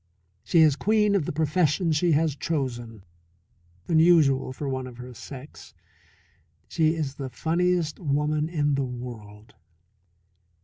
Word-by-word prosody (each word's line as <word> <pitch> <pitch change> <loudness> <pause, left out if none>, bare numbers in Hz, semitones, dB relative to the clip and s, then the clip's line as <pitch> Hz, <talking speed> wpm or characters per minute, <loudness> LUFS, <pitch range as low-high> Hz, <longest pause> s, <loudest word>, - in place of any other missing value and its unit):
She 170 - +3
is 155 -3 +5
queen 210 +3 +2
of 190 -7 +1
the - - -2
profession 160 +2 +1
she 160 +2 +2
has 155 -1 +1
chosen 120 - -4 0.8
unusual 160 -6 +4
for 140 +2 -6
one 130 -1 -3
of 125 -2 -11
her 125 0 -9
sex. 135 +3 -11 0.9
She 160 -1 +1
is 150 -4 -3
the 135 -2 -6
funniest 165 +5 0
woman 150 0 0
in 145 -4 0
the 140 0 0
world. 115 -4 -9
150 Hz, 130 wpm, -25 LUFS, 130-165 Hz, 0.9 s, is